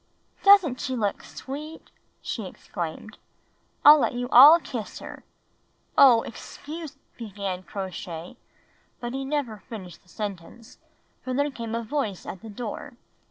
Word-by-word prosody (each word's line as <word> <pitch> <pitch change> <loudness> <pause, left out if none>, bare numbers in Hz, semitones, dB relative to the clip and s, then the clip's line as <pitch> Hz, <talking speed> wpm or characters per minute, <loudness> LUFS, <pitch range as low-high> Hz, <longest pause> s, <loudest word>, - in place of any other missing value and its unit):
"Doesn't 390 -10 +5
she 260 - -2
look 210 -4 -1
sweet!" 300 +4 -9 0.3
she - - -4
exclaimed. - - -7 0.7
"I'll 300 +1 +10
let - - +1
you 245 0 -2
all 290 +8 +9
kiss 235 -9 -6
her." - - -10 0.7
"Oh, 240 -5 +7
excuse 300 +5 -9
— - - -43
!" - - -38
began 200 -4 -5
Crow 190 +1 -6
Shay, 170 -1 -8 0.6
but 240 0 -5
he 270 0 -3
never 270 -7 -3
finished 185 -7 -9
the 180 - -27
sentence, 205 +3 -8 0.4
for 255 -1 -3
there 285 +2 +1
came 230 -3 -5
a 230 - -2
voice 220 -6 -3
at 185 - -7
the 225 - -10
door. 225 +4 -7
240 Hz, 150 wpm, -25 LUFS, 200-280 Hz, 0.7 s, I'll